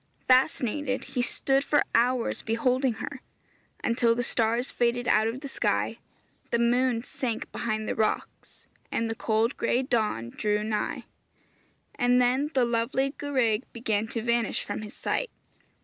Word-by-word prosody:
Fascinated, 255 0 +2
he 250 - +1
stood 270 +3 +1
for 295 - +3
hours 245 +1 +2
beholding 250 +3 +1
her, 255 +4 -7 0.6
until 235 -1 +2
the 245 - -1
stars 235 +2 0
faded 240 0 0
out 215 +1 +4
of 240 +4 -4
the 285 - -5
sky, - - -1 0.5
the 235 - +2
moon 240 0 +2
sank 250 -4 -4
behind 215 -2 -2
the - - 0
rocks, 220 -1 -3 0.2
and 230 - 0
the 225 - -2
cold 225 +2 0
gray 255 - +1
dawn 215 - -1
drew 210 0 0
nigh; 215 -1 -2 0.9
and 245 0 +3
then 255 +4 +2
the 255 -2 +4
lovely 235 +4 0
gwraig 255 -7 +1
began 220 -2 -1
to 225 0 -4
vanish 235 -1 0
from - - -4
his 210 -1 -9
sight. - - -1
235 Hz, 150 wpm, -27 LUFS, 225-255 Hz, 0.9 s, out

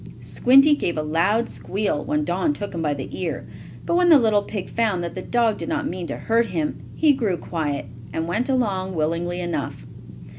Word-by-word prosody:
Squinty 275 +4 +5
gave 170 - -2
a 155 - 0
loud 190 +10 +1
squeal 200 -7 -2
when 150 0 0
Don 185 - 0
took 205 -7 -6
him 170 - -3
by 150 -2 0
the 135 - -5
ear, 170 -3 -3 0.4
but - - 0
when 355 0 +4
the 315 - +9
little 220 -5 +3
pig 200 -2 -5
found 215 -6 0
that 170 - -4
the 185 - -5
dog 230 0 +1
did 165 - -4
not - - -1
mean 175 -1 -4
to - - -4
hurt 230 +1 +1
him, 160 -6 -2
he 305 -2 +4
grew 220 -9 0
quiet, 150 -5 -3 0.3
and 160 0 -2
went 230 +10 -1
along 195 -8 0
willingly 170 +3 -1
enough. 175 - -4
185 Hz, 200 wpm, -23 LUFS, 165-230 Hz, 0.4 s, the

